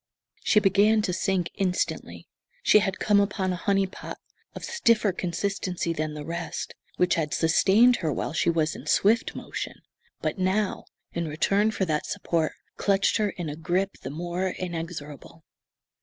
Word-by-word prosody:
She 210 Hz, -, +5 dB
began 210 Hz, +2 st, +4 dB
to 180 Hz, -, -1 dB
sink 185 Hz, -1 st, 0 dB
instantly. 185 Hz, -2 st, -2 dB, 0.4 s
She 210 Hz, -, +6 dB
had 195 Hz, -2 st, -1 dB
come 205 Hz, -1 st, +3 dB
upon 195 Hz, -2 st, 0 dB
a 180 Hz, -, -7 dB
"honey 195 Hz, -1 st, +3 dB
pot" 190 Hz, -, -8 dB, 0.4 s
of -, -, -7 dB
stiffer 230 Hz, -, +2 dB
consistency 180 Hz, -1 st, -2 dB
than 155 Hz, -1 st, -3 dB
the 150 Hz, -1 st, -6 dB
rest, 165 Hz, 0 st, -4 dB, 0.2 s
which 180 Hz, 0 st, +3 dB
had 155 Hz, -3 st, 0 dB
sustained 200 Hz, +9 st, +5 dB
her 160 Hz, -4 st, -1 dB
while 145 Hz, -, -3 dB
she 170 Hz, +2 st, +2 dB
was 160 Hz, -1 st, +1 dB
in -, -, -10 dB
swift 220 Hz, +4 st, +3 dB
motion, -, -, -5 dB, 0.4 s
but -, -, -2 dB
now, 190 Hz, +2 st, 0 dB, 0.3 s
in 170 Hz, -1 st, -2 dB
return 195 Hz, +7 st, +2 dB
for 205 Hz, -3 st, -1 dB
that 155 Hz, -3 st, -1 dB
support, 170 Hz, -5 st, -1 dB, 0.2 s
clutched 195 Hz, -1 st, +2 dB
her 210 Hz, -2 st, +1 dB
in 175 Hz, -3 st, -5 dB
a 145 Hz, -, -4 dB
grip 180 Hz, +5 st, 0 dB
the -, -, -5 dB
more 175 Hz, +5 st, -2 dB
inexorable. 165 Hz, -3 st, -6 dB
185 Hz, 160 wpm, -26 LUFS, 165-200 Hz, 0.4 s, She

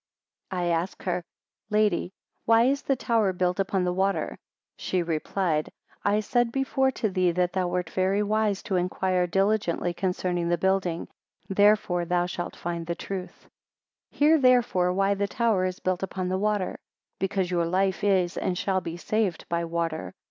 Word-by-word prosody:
41 180 Hz, -2 st, -2 dB
I -, -, +1 dB
asked 180 Hz, +3 st, -6 dB
her, 180 Hz, -1 st, -1 dB, 0.5 s
Lady, 210 Hz, -4 st, +1 dB, 0.3 s
why 225 Hz, 0 st, +5 dB
is 275 Hz, +3 st, +2 dB
the 275 Hz, -, +1 dB
tower 225 Hz, -5 st, +1 dB
built 180 Hz, 0 st, -1 dB
upon 190 Hz, -1 st, +1 dB
the 180 Hz, 0 st, 0 dB
water? 195 Hz, +2 st, -1 dB, 0.4 s
She 185 Hz, -2 st, 0 dB
replied, 165 Hz, 0 st, -1 dB, 0.3 s
I 205 Hz, +1 st, +2 dB
said 240 Hz, +2 st, +1 dB
before 270 Hz, 0 st, +1 dB
to 220 Hz, -, -1 dB
thee 185 Hz, -1 st, +2 dB
that 180 Hz, 0 st, 0 dB
thou 185 Hz, -1 st, 0 dB
wert 180 Hz, -1 st, -2 dB
very 190 Hz, +2 st, +1 dB
wise 210 Hz, -1 st, 0 dB
to 195 Hz, -4 st, -1 dB
inquire 180 Hz, 0 st, 0 dB
diligently 195 Hz, -2 st, +1 dB
concerning 180 Hz, -1 st, -1 dB
the 175 Hz, -, +2 dB
building, 190 Hz, -3 st, 0 dB, 0.4 s
therefore 195 Hz, -3 st, +3 dB
thou 175 Hz, +1 st, +1 dB
shalt 175 Hz, -1 st, -5 dB
find 170 Hz, -1 st, -4 dB
the 170 Hz, -, -2 dB
truth. 185 Hz, 0 st, -7 dB, 0.6 s
42 -, -, -24 dB
Hear 305 Hz, +2 st, +5 dB
therefore 245 Hz, -9 st, +3 dB
why 195 Hz, +2 st, +2 dB
the 200 Hz, 0 st, -1 dB
tower 220 Hz, -5 st, +1 dB
is 185 Hz, 0 st, -3 dB
built 185 Hz, -1 st, -1 dB
upon 185 Hz, -1 st, -3 dB
the 185 Hz, +1 st, 0 dB
water: 210 Hz, -2 st, -1 dB, 0.4 s
because 190 Hz, -1 st, -1 dB
your 170 Hz, -2 st, +1 dB
life 190 Hz, +2 st, 0 dB
is 190 Hz, -3 st, +2 dB
and 180 Hz, -, -1 dB
shall 190 Hz, 0 st, 0 dB
be 170 Hz, -1 st, -6 dB
saved 200 Hz, -2 st, -1 dB
by 170 Hz, 0 st, 0 dB
water. 165 Hz, +1 st, -3 dB
185 Hz, 170 wpm, -26 LUFS, 180-205 Hz, 0.6 s, why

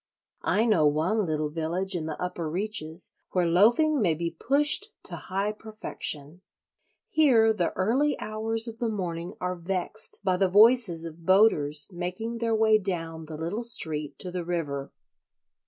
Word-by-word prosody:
I 220 Hz, +3 st, +1 dB
know 180 Hz, -10 st, +4 dB
one 170 Hz, +8 st, +1 dB
little 155 Hz, -1 st, -1 dB
village 170 Hz, +5 st, -2 dB
in 160 Hz, -2 st, -3 dB
the 160 Hz, -, -5 dB
upper 175 Hz, -3 st, -3 dB
reaches 175 Hz, -2 st, -2 dB, 0.2 s
where 180 Hz, -2 st, +2 dB
loafing 235 Hz, -, +4 dB
may 170 Hz, -6 st, +2 dB
be 170 Hz, +1 st, -3 dB
pushed 290 Hz, -, +2 dB, 0.2 s
to -, -, -3 dB
high 195 Hz, +3 st, -2 dB
perfection. 180 Hz, -7 st, -5 dB, 0.7 s
Here 240 Hz, -8 st, +4 dB
the 180 Hz, -5 st, -1 dB
early 255 Hz, +10 st, +1 dB
hours 220 Hz, +2 st, -2 dB
of 230 Hz, 0 st, -7 dB
the 235 Hz, -2 st, 0 dB
morning 175 Hz, -5 st, -4 dB
are 180 Hz, 0 st, -2 dB
vexed 185 Hz, +4 st, -3 dB
by 185 Hz, -2 st, +1 dB
the 190 Hz, 0 st, +2 dB
voices 205 Hz, -4 st, +5 dB
of 165 Hz, 0 st, -10 dB
boaters 155 Hz, -8 st, +3 dB
making 185 Hz, +7 st, -4 dB
their 230 Hz, -1 st, 0 dB
way 220 Hz, 0 st, +4 dB
down 165 Hz, -5 st, -4 dB
the 155 Hz, 0 st, -8 dB
little 170 Hz, +8 st, -3 dB
street 155 Hz, -10 st, 0 dB
to 180 Hz, -, -5 dB
the 180 Hz, -1 st, -3 dB
river. 150 Hz, -5 st, -3 dB
185 Hz, 155 wpm, -27 LUFS, 165-220 Hz, 0.7 s, voices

